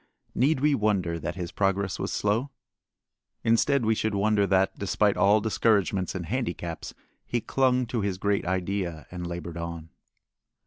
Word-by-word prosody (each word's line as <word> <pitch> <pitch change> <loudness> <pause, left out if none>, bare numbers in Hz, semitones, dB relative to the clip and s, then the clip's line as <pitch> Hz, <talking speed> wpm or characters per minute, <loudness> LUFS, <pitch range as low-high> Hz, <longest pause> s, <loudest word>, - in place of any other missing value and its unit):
Need 135 +2 +2
we 150 0 +4
wonder 100 -8 0
that 85 - -4
his 90 -2 -5
progress 95 0 0
was - - -2
slow? 110 +7 0 0.9
Instead 115 +3 +3
we 110 - +3
should 110 -1 -1
wonder 100 0 +2
that, 95 0 +2
despite 100 +1 +2
all 105 +2 +4
discouragements 100 -4 +1
and 90 -2 -3
handicaps, 105 -7 -4 0.3
he 120 - -1
clung 130 +1 +1
to 115 -1 -2
his 100 -2 -1
great 100 +1 0
idea 90 -2 -2
and 90 -1 -5
labored 85 -1 -6
on. 85 -1 -6
100 Hz, 150 wpm, -27 LUFS, 90-110 Hz, 0.9 s, we